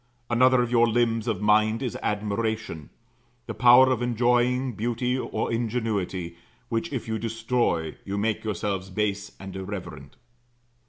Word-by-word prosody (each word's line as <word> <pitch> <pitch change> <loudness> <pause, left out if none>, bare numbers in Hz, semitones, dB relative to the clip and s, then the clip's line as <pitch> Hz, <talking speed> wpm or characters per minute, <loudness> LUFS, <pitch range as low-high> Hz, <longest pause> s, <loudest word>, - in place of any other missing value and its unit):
Another 125 +1 +4
of 120 - -4
your 120 -1 +4
limbs 115 0 +1
of 105 -3 -1
mind 110 +3 +3
is 125 - -3
admiration; 105 - -2 0.6
the - - -5
power 125 +1 +6
of 125 -2 0
enjoying 125 +2 +1
beauty 120 +3 -1
or 130 - -2
ingenuity, 105 -7 -2 0.3
which, 115 +8 -2
if 130 -5 -4
you 110 -1 -2
destroy, 115 -7 -1
you 100 +1 -4
make 110 +1 -1
yourselves 100 -2 -3
base 100 +1 -2
and 95 0 -8
irreverent. 95 -8 -7
110 Hz, 140 wpm, -26 LUFS, 100-120 Hz, 0.6 s, power